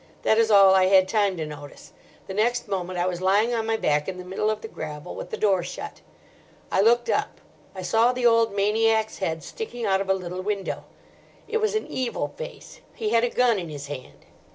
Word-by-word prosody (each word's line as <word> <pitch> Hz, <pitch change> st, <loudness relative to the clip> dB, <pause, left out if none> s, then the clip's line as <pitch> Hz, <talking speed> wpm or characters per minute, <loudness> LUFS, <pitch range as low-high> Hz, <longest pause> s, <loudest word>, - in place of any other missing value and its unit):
That 220 Hz, -, +3 dB
is 225 Hz, -1 st, +3 dB
all 195 Hz, -2 st, +7 dB
I 190 Hz, -1 st, +5 dB
had 190 Hz, 0 st, +5 dB
time 200 Hz, -3 st, +1 dB
to 160 Hz, -, -3 dB
notice. 145 Hz, -1 st, -11 dB, 0.3 s
The 190 Hz, -, -7 dB
next 240 Hz, +4 st, 0 dB
moment 185 Hz, -2 st, -3 dB
I 175 Hz, -, +1 dB
was 180 Hz, -1 st, -2 dB
lying 205 Hz, +5 st, +3 dB
on 225 Hz, -1 st, -1 dB
my 225 Hz, 0 st, +1 dB
back 150 Hz, -6 st, +1 dB
in 185 Hz, -, -5 dB
the 180 Hz, -, -8 dB
middle 195 Hz, +3 st, -1 dB
of 215 Hz, 0 st, -2 dB
the -, -, -6 dB
gravel 155 Hz, -4 st, -7 dB
with -, -, -7 dB
the -, -, -4 dB
door 195 Hz, -4 st, +2 dB
shut. 175 Hz, -, -7 dB, 0.7 s
I 190 Hz, -, +3 dB
looked 240 Hz, +3 st, +3 dB
up. -, -, -1 dB, 0.4 s
I 185 Hz, -, -6 dB
saw 225 Hz, +6 st, +3 dB
the 250 Hz, -1 st, -2 dB
old 230 Hz, -1 st, +4 dB
maniac's 220 Hz, +2 st, +1 dB
head 160 Hz, -4 st, -2 dB
sticking 245 Hz, -, -6 dB
out 195 Hz, -1 st, +2 dB
of 195 Hz, -, -5 dB
a 190 Hz, -, +4 dB
little 180 Hz, 0 st, -5 dB
window. 200 Hz, 0 st, -3 dB, 0.6 s
It 450 Hz, -, 0 dB
was 435 Hz, -1 st, 0 dB
an 435 Hz, -, -1 dB
evil 255 Hz, -2 st, -3 dB
face. -, -, -9 dB
He 435 Hz, -, -2 dB
had 230 Hz, -, +3 dB
a 245 Hz, -, +2 dB
gun 235 Hz, -4 st, +2 dB
in 170 Hz, -3 st, -6 dB
his 145 Hz, -2 st, -7 dB
hand. 140 Hz, -3 st, -9 dB
200 Hz, 225 wpm, -25 LUFS, 185-230 Hz, 0.7 s, all